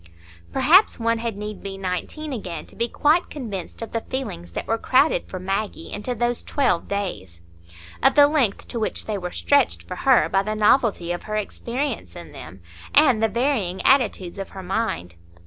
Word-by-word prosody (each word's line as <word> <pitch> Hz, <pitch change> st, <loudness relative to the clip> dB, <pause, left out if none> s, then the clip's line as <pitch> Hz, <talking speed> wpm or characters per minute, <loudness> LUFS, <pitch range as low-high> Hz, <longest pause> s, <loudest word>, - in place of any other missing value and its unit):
Perhaps 315 Hz, +9 st, +5 dB
one 230 Hz, 0 st, +1 dB
had 230 Hz, -3 st, -3 dB
need 210 Hz, 0 st, -6 dB
be 195 Hz, -1 st, -6 dB
nineteen 195 Hz, -, -4 dB
again 175 Hz, -9 st, -5 dB
to -, -, -16 dB
be 235 Hz, -, 0 dB
quite 310 Hz, +8 st, +2 dB
convinced 220 Hz, -, -6 dB
of 230 Hz, -, -7 dB
the 230 Hz, -, -2 dB
feelings 85 Hz, -, -5 dB
that -, -, -4 dB
were 225 Hz, 0 st, 0 dB
crowded 265 Hz, +6 st, +2 dB
for 185 Hz, -, -6 dB
Maggie 195 Hz, -1 st, -3 dB
into 245 Hz, +4 st, -3 dB
those 240 Hz, +1 st, 0 dB
twelve 265 Hz, -, 0 dB
days; 105 Hz, -, -4 dB, 0.6 s
of -, -, +4 dB
the 290 Hz, -, +8 dB
length 285 Hz, -9 st, +1 dB
to 235 Hz, -, -3 dB
which 220 Hz, -, -2 dB
they 210 Hz, -2 st, -2 dB
were 180 Hz, -1 st, -4 dB
stretched 285 Hz, +7 st, +2 dB
for 180 Hz, -, -7 dB
her 265 Hz, -3 st, +4 dB
by 195 Hz, -, +2 dB
the 215 Hz, +2 st, -3 dB
novelty 210 Hz, -5 st, +3 dB
of 175 Hz, -, -4 dB
her 215 Hz, -, -3 dB
experience 235 Hz, -, -3 dB
in -, -, -10 dB
them, 90 Hz, +4 st, -11 dB, 0.3 s
and 260 Hz, -7 st, +6 dB
the 225 Hz, -, +3 dB
varying 235 Hz, -8 st, 0 dB
attitudes 215 Hz, -9 st, +2 dB
of 195 Hz, -, -5 dB
her 190 Hz, -, -9 dB
mind. 180 Hz, -, -2 dB
215 Hz, 185 wpm, -23 LUFS, 190-255 Hz, 0.6 s, the